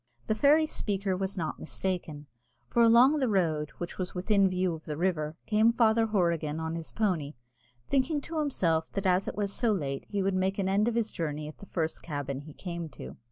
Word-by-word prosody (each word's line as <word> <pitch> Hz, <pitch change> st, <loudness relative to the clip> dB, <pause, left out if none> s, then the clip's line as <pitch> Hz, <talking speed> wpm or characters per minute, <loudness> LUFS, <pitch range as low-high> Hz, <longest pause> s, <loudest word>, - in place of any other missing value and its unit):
The -, -, +1 dB
fairy 290 Hz, +7 st, +5 dB
speaker 200 Hz, -9 st, -1 dB
was 190 Hz, +1 st, -3 dB
not 160 Hz, -3 st, -3 dB
mistaken; 160 Hz, -5 st, -3 dB, 0.4 s
for 235 Hz, -, +2 dB
along 240 Hz, +6 st, +6 dB
the 260 Hz, -, +2 dB
road, 160 Hz, -7 st, +1 dB
which 175 Hz, +2 st, -6 dB
was 185 Hz, 0 st, -3 dB
within 195 Hz, +1 st, +3 dB
view 185 Hz, -1 st, 0 dB
of 160 Hz, 0 st, -9 dB
the 150 Hz, -2 st, -4 dB
river, 160 Hz, -3 st, -1 dB
came 220 Hz, +1 st, +4 dB
Father 225 Hz, -1 st, +3 dB
Horrigan 170 Hz, -7 st, 0 dB
on 160 Hz, 0 st, -3 dB
his 165 Hz, -1 st, -6 dB
pony, 170 Hz, -9 st, -1 dB, 0.5 s
thinking 280 Hz, +2 st, +1 dB
to 320 Hz, +2 st, -4 dB
himself 170 Hz, -, 0 dB
that 195 Hz, 0 st, -2 dB
as 185 Hz, +1 st, +2 dB
it -, -, -3 dB
was 200 Hz, -1 st, -2 dB
so 235 Hz, -3 st, +1 dB
late 140 Hz, -9 st, -2 dB
he 200 Hz, -2 st, -1 dB
would 195 Hz, 0 st, +1 dB
make 190 Hz, +1 st, 0 dB
an 195 Hz, -2 st, 0 dB
end 200 Hz, +3 st, +2 dB
of 235 Hz, -, 0 dB
his 230 Hz, -2 st, 0 dB
journey 150 Hz, -2 st, -3 dB
at 155 Hz, -, -10 dB
the 200 Hz, -, -11 dB
first 160 Hz, -3 st, -2 dB
cabin 145 Hz, -4 st, -4 dB
he 145 Hz, +1 st, -11 dB
came 170 Hz, -2 st, -5 dB
to. 65 Hz, -, -10 dB
185 Hz, 210 wpm, -29 LUFS, 160-215 Hz, 0.5 s, along